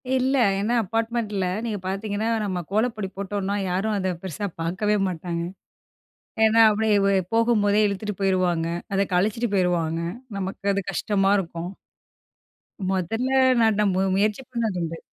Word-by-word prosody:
இல்லை, 260 +1 +2 0.2
ஏன்னா 220 +4 0
அபார்ட்மெண்ட்ல 225 -2 -1 0.2
நீங்க 215 -3 -2
பாத்தீங்கன்னா, 205 +3 -2 0.2
நம்ம 185 -3 -2
கோலப்பொடி 215 -2 0
போட்டோம்னா, 200 0 -2
யாரும் 195 +4 0
அத 190 -1 -1
பெருசா 190 +3 -4 0.2
பாக்கவே 200 +5 0
மாட்டாங்க. 170 0 -4 1.0
ஏன்னா 220 +1 +5
அப்படியே 215 0 +2
வ - - +4 0.2
போகும்போதே 215 -3 +3
இழுத்துட்டு 210 +1 -2
போயிருவாங்க. 180 -4 +1 0.3
அதை 195 +1 +3
கலச்சிட்டு 215 +6 +1
போயிருவாங்க. 170 -3 +1 0.4
நமக்கு 195 +1 -5
அது 200 - 0
கஷ்டமா 195 -1 +1
இருக்கும். 170 -1 -5 1.2
மொதல்ல 195 +7 -1 0.3
நான் 220 -2 +3
நா - - +3 0.3
முயற்சி 210 +5 +1
பண்ணது 225 -7 -1
உண்டு. 165 0 -5
200 Hz, 125 wpm, -24 LUFS, 185-220 Hz, 1.2 s, ஏன்னா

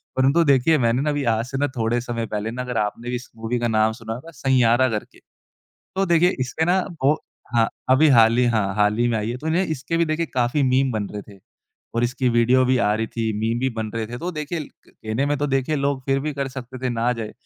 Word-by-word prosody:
परंतु 135 +6 +3
देखिए 140 +3 +4
मैंने 120 -1 +1
ना 150 - 0
अभी 145 -1 -1
आज 115 - -2
से 135 +2 -5
ना 145 +1 +1
थोड़े 115 +1 +1
समय 120 -1 -3
पहले 105 +1 -3
ना 125 +2 -4
अगर 125 -2 -4
आपने 105 +3 -2
भी 125 - -1
इस 125 0 -7
मूवी 115 +2 -2
का 120 - 0
नाम 110 -1 +2
सुना 115 -1 -6
होगा 130 +8 -9
सैंयारा 130 -3 +3
करके। 105 -2 -5 0.8
तो 195 - +1
देखिए 175 0 +4
इसके 130 +5 -1
ना 180 +3 +3 0.2
वो 145 +3 +5 0.4
हाँ, 115 -1 +4 0.2
अभी 145 +4 +6
हाल 115 +1 +5
ही 125 - +4
हाँ, 105 -5 0
हाल 105 0 +2
ही 120 0 +2
में 115 -2 0
आई 105 +1 -2
है, 120 - -3
तो 145 +5 -8
उन्हें 170 +4 +2
इसके 155 +2 -3
भी 170 - +3
देखिए 160 +1 -1
काफ़ी 125 +3 +1
मीम 130 0 +2
बन 105 -2 -2
रहे 105 -1 -5
थे। - - -18 0.6
और 115 +1 +1
इसकी 125 +1 0
वीडियो 120 +2 +4
भी 130 0 +2
आ 105 -3 +2
रही 110 +1 -1
थी, 110 -1 -2
मीम 115 +2 0
भी 130 - +1
बन 110 -1 -3
रहे 115 -1 -2
थे, 120 +2 -7
तो 175 +5 -3
देखिए 155 +1 -4 0.3
कहने 110 +5 -3
में 145 0 +1
तो 145 - 0
देखिए 135 +2 0
लोग 140 -1 -1
फिर 135 0 +1
भी 150 +2 -3
कर 140 -1 -2
सकते 130 -1 -8
थे - - +1
ना 120 +1 0
जाए, 115 -3 -6
125 Hz, 255 wpm, -22 LUFS, 115-140 Hz, 0.8 s, अभी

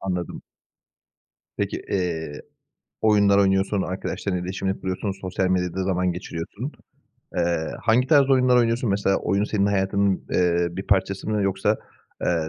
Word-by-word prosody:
Anladım. 90 -2 -4 1.1
Peki, - - -2
eee, 80 -6 -2 0.6
oyunlar 100 -2 +4
oynuyorsun, 95 0 +2
arkadaşlarınla 95 0 -3
iletişimini 95 +1 -3
kuruyorsun, 95 +2 -2
sosyal 95 0 -1
medyada 90 0 0
zaman 90 -1 +1
geçiriyorsun. 90 - -6 0.6
Eee, 85 -2 0
hangi 120 +3 +3
tarz 140 -2 +5
oyunlar 125 -2 +4
oynuyorsun? 115 -1 +2
Mesela 100 -1 +2
oyun 100 +1 0
senin 100 -2 +1
hayatının, 100 -1 +1
eee, 85 -1 +2
bir 95 +3 -6
parçası 95 0 +1
mı 105 -2 +1
yoksa, 95 -1 +1 0.5
eee, 80 -2 0
95 Hz, 130 wpm, -24 LUFS, 90-100 Hz, 1.1 s, tarz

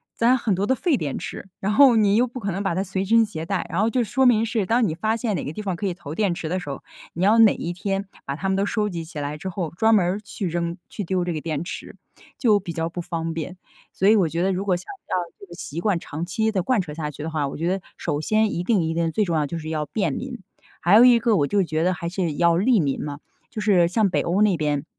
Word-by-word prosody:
攒 245 +3 +4
很 225 -4 0
多 195 - 0
的 260 - +2
废 330 +2 +1
电 145 - -3
池。 195 - -7
然 200 +2 -1
后 265 0 +7
你 205 -2 +4
又 240 +3 +4
不 250 +2 -8
可 200 -4 -2
能 195 +3 -3
把 195 - 0
它 190 - 0
随 190 0 -2
身 230 +2 +4
携 165 -7 -6
带， 190 +2 -2
然 180 +4 0
后 220 - +3
就 250 +2 +1
说 240 +5 +1
明 230 -3 +4
是 225 -3 -1
当 230 +2 +2
你 155 - -2
发 220 +6 0
现 225 -4 -1
哪 - - -3
个 145 - -4
地 215 - -5
方 190 -3 -2
可 185 - -4
以 185 - 0
投 160 -4 -8
电 200 -3 +1
池 170 - -5
的 185 - 0
时 180 - -8
候， 140 - -6 0.3
你 170 - -2
要 215 +3 +5
哪 225 -2 +7
一 170 - -4
天 195 +2 -2 0.2
把 140 - -3
它 195 - -3
们 190 - +2
都 195 - +1
收 210 0 0
集 170 -3 -4
起 160 -2 -8
来 145 +1 -4
之 190 +5 -5
后， 170 -4 -4
专 220 +6 +3
门 190 -4 +3
儿 190 +4 -1
去 210 -2 -5
扔、 170 0 -2
去 210 - -5
丢 185 0 0
这 175 - -2
个 155 - -4
电 155 -1 -3
池， - - -7 0.4
就 215 -5 +4
比 180 -3 -6
较 165 0 -2
不 175 +1 -5
方 165 -1 -3
便。 165 +3 -5 0.4
所 190 - +1
以 215 - +7
我 185 -6 +3
觉 165 +3 -2
得 195 - +2
如 185 +2 -2
果 190 -3 +2
想 175 - -7 0.2
要 - - 0 0.2
这 - - -11
个 175 - -13
习 160 -1 -6
惯 200 -6 +1
长 160 +2 -5
期 220 +5 0
地 190 -4 0
贯 230 0 +2
彻 150 -4 -7
下 150 -1 -4
去 145 - -8
的 160 - -3
话， 155 -3 -1
我 - - -6
觉 165 +3 -1
得 190 0 -1 0.2
首 150 -3 -2
先 215 +4 +1
一 175 - -2
定 200 -3 +2
一 160 0 -1
定 165 -1 0
最 215 - +1
重 170 -3 -1
要 155 - +2
的 145 - -1
就 170 - -4
是 155 -1 -6
要 155 -1 -2
便 215 - -1
民。 255 -2 -5 0.4
还 175 +5 +5
有 225 - +9
一 245 -2 +7
个 230 -1 +2
我 145 - +2
就 200 +2 +2
觉 160 -2 -1
得 185 +1 +2
还 170 - -5
是 175 -3 -2
要 170 0 +3
利 220 +4 +3
民 140 -5 -1
嘛， 145 -1 -5 0.3
就 215 - -5
是 185 -5 +4
像 205 +2 +2
北 - - +1
欧 180 +4 0
那 200 -4 +3
边， 150 -2 -1
185 Hz, 325 characters per minute, -23 LUFS, 165-215 Hz, 0.4 s, 有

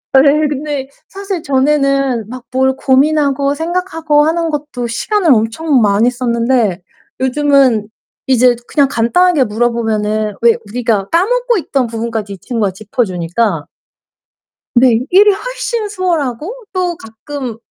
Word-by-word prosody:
예. 290 +3 +5
근데 285 -1 -4 0.2
사실 390 -2 -5
전에는 275 -4 +1
막 255 0 -9
뭘 265 +1 +1
고민하고 280 +1 +2
생각하고 325 -2 0
하는 330 +1 0
것도 290 -5 -4
시간을 340 - +1
엄청 245 +5 +1
많이 210 +4 +3
썼는데 235 -5 0 0.4
요즘은 260 -4 +2 0.4
이제 250 -1 +4
그냥 285 -2 +2
간단하게 295 +6 +2
물어보면은 215 -2 -1
왜 235 -1 +5
우리가 220 -4 -1
까먹고 475 +7 +1
있던 275 -8 -1
부분까지 225 -2 -4
이 195 - -9
친구가 215 0 -2
짚어주니까 190 - -2 1.1
네. 240 -2 +5
일이 405 +3 +6
훨씬 470 0 -3
수월하고 365 - -3
또 360 -2 -1
가끔 245 -1 -7
265 Hz, 280 characters per minute, -14 LUFS, 230-315 Hz, 1.1 s, 일이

